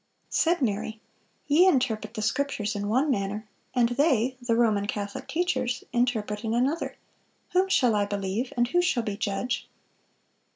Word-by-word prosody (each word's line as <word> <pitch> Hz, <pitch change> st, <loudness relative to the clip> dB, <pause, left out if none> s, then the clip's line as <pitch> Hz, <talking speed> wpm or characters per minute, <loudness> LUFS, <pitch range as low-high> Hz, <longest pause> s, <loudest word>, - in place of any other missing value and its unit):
Said 335 Hz, -3 st, +2 dB
Mary, 220 Hz, 0 st, -2 dB, 0.5 s
"Ye 320 Hz, +6 st, +5 dB
interpret 230 Hz, -, +1 dB
the 215 Hz, -, -3 dB
Scriptures 220 Hz, -3 st, -1 dB
in 205 Hz, 0 st, -2 dB
one 265 Hz, +6 st, +2 dB
manner, 205 Hz, -1 st, -2 dB, 0.3 s
and 240 Hz, -2 st, +4 dB
they 260 Hz, -2 st, +2 dB
[the 240 Hz, -2 st, +1 dB
Roman 215 Hz, -4 st, +2 dB
Catholic 205 Hz, -1 st, -4 dB
teachers] 255 Hz, -8 st, -1 dB
interpret 225 Hz, -4 st, 0 dB
in 225 Hz, 0 st, -1 dB
another; 275 Hz, +7 st, 0 dB, 0.6 s
whom 375 Hz, +1 st, +2 dB
shall 250 Hz, -, +4 dB
I 205 Hz, -1 st, +2 dB
believe, 200 Hz, +4 st, -2 dB
and 240 Hz, 0 st, +3 dB
who 355 Hz, -, +3 dB
shall 265 Hz, -9 st, +1 dB
be 210 Hz, -3 st, -3 dB
judge?" 220 Hz, +3 st, -2 dB
240 Hz, 155 wpm, -27 LUFS, 210-265 Hz, 0.6 s, Ye